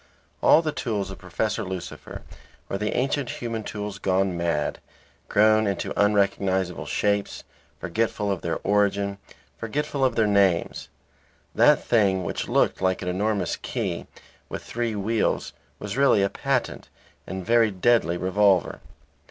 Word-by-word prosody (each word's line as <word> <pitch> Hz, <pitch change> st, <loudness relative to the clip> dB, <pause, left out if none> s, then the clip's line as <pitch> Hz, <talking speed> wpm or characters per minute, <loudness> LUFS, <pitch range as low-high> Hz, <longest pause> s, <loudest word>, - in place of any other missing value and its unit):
All 165 Hz, -, +6 dB
the 155 Hz, -, -1 dB
tools 105 Hz, -8 st, -3 dB
of 95 Hz, -, -10 dB
Professor 110 Hz, +5 st, -2 dB
Lucifer 95 Hz, -2 st, -7 dB, 0.4 s
were 95 Hz, -, -3 dB
the 105 Hz, -, -1 dB
ancient 135 Hz, 0 st, 0 dB
human 115 Hz, -2 st, -4 dB
tools 105 Hz, -1 st, -6 dB
gone 95 Hz, -1 st, +1 dB
mad, 85 Hz, -3 st, -1 dB, 0.5 s
grown 110 Hz, +1 st, +4 dB
into 100 Hz, -, -2 dB
unrecognizable 100 Hz, -3 st, +1 dB
shapes, 100 Hz, -1 st, -1 dB, 0.4 s
forgetful 105 Hz, +2 st, -1 dB
of 95 Hz, -, -2 dB
their 85 Hz, -, -2 dB
origin, 100 Hz, -1 st, +1 dB, 0.4 s
forgetful 140 Hz, +4 st, -2 dB
of 130 Hz, -3 st, +2 dB
their 110 Hz, -, +3 dB
names. 100 Hz, -4 st, +1 dB, 0.6 s
That -, -, +4 dB
thing 100 Hz, -5 st, +2 dB
which -, -, -3 dB
looked -, -, +1 dB
like 95 Hz, 0 st, 0 dB
an 90 Hz, -, -2 dB
enormous 100 Hz, 0 st, -1 dB
key -, -, -4 dB, 0.4 s
with -, -, -6 dB
three 115 Hz, -2 st, -3 dB
wheels 105 Hz, +2 st, -1 dB, 0.2 s
was 105 Hz, +3 st, -6 dB
really 135 Hz, -7 st, +4 dB
a 100 Hz, -, +2 dB
patent -, -, -2 dB, 0.4 s
and 95 Hz, -1 st, -5 dB
very 115 Hz, -1 st, +4 dB
deadly 95 Hz, -3 st, +2 dB
revolver. 95 Hz, 0 st, +2 dB
100 Hz, 135 wpm, -25 LUFS, 95-110 Hz, 0.6 s, All